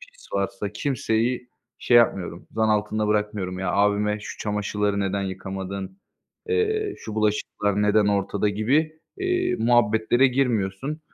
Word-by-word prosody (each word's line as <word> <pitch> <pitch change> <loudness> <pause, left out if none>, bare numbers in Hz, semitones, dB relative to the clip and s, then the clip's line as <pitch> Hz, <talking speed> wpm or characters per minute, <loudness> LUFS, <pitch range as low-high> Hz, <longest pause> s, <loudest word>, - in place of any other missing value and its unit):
pis - - -16
varsa 100 +1 -2
kimseyi 125 -2 -1 0.3
şey 120 - +3
yapmıyorum, 95 -6 +2
zan 110 0 +1
altında 105 0 +1
bırakmıyorum. 105 -3 -1
Ya, 95 - -1
abime, 105 +1 +2
"Şu - - -8
çamaşırları 105 -1 -1
neden 100 0 -1
yıkamadın, 95 0 -5 0.5
eee, 435 -2 0
şu 110 - -7
bulaşıklar 105 -1 0
neden 105 0 +3
ortada?" 100 0 +1
gibi, 135 +10 +1 0.3
eee, 365 -1 0
muhabbetlere 115 +2 +3
girmiyorsun. 125 +1 -1
105 Hz, 125 wpm, -24 LUFS, 100-125 Hz, 0.5 s, şey